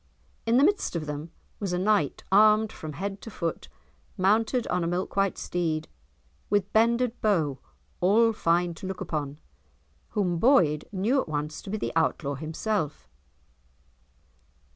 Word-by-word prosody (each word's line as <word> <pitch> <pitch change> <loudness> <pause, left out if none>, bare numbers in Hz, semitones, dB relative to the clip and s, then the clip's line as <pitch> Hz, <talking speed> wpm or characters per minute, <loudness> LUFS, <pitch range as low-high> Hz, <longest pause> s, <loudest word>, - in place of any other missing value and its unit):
In 230 +2 +4
the 270 - +5
midst 390 - +2
of 160 -2 -2
them 150 +2 -5 0.3
was 195 -4 -2
a - - +1
knight 195 -5 +1
armed 215 +2 +5
from 155 -6 -8
head 195 +5 -5
to - - -8
foot, 170 -6 -4 0.5
mounted 220 +6 +2
on 180 -1 -1
a - - -1
milk 175 +2 -2
white 195 -1 +1
steed, 160 -3 -2 0.6
with 205 -1 0
bended 235 +2 +2
bow, 160 - +1 0.4
all 225 +5 +4
fine 175 -3 +1
to 175 +3 -8
look 190 -1 -5
upon; 145 -2 -4 0.8
whom 180 -4 +1
Boyd 165 - +4
knew 215 +8 +1
at - - -8
once 150 0 -3
to - - -10
be 215 - -2
the - - -3
Outlaw 160 -3 +1
himself. 160 +3 -3
185 Hz, 150 wpm, -27 LUFS, 160-215 Hz, 0.8 s, the